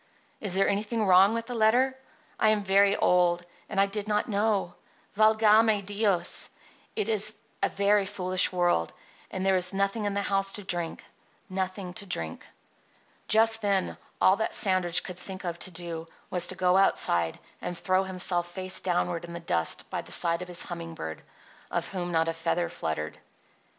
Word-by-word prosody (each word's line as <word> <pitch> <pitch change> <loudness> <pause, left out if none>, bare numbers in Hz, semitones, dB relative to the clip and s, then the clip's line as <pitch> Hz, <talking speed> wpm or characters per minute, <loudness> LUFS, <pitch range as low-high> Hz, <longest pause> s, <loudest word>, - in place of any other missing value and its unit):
Is 195 -4 -2
there 195 - +3
anything 215 +2 -1
wrong 195 +4 +5
in 230 - -3
the 245 - -6
letter? 245 +4 +3 0.4
I 215 - +4
am 215 -1 +2
very 200 +1 +4
old; 175 -1 +2 0.2
and 195 - -2
I 195 - +5
did 205 +1 -3
not 210 -1 0
know. 205 -4 0 0.4
Valgame 215 -1 +4
Dios! 205 -2 0 0.5
it 425 - -1
is 215 0 0 0.3
a - - +2
very 200 0 +2
foolish 185 -2 +2
world; 175 - +1 0.4
and 190 0 -4
there 195 0 +3
is 180 +1 +1
nothing 200 +2 0
in 200 -1 -1
the 200 - 0
house 195 0 0
to 205 - -1
drink— 175 -3 -3 0.5
nothing 185 -1 -3
to 200 0 -5
drink." 80 - -5 0.8
Just 225 +1 +3
then 200 -2 0 0.2
all 190 +2 +5
that 220 - -1
Sandridge 185 -4 +3
could 180 -1 -8
think 190 +1 -8
of 170 -1 -4
to - - -1
do 165 -2 -6 0.2
was 175 -1 +2
to 185 - -2
go 185 0 +2
outside 85 - +2 0.2
and 175 -1 -4
throw 185 +2 +1
himself 180 -2 0
face 185 +1 0
downward 175 -1 -1
in 170 0 -8
the 170 - -5
dust 85 - -1
by - - -2
the - - -12
side 170 -1 +4
of 180 - -6
his 175 -1 -1
humming 165 -1 -7
bird, 80 - -6 0.5
of - - -2
whom 175 -2 -4
not 165 -1 +1
a 165 - 0
feather 165 +1 -1
fluttered. 75 -1 -4
190 Hz, 180 wpm, -27 LUFS, 175-205 Hz, 0.8 s, wrong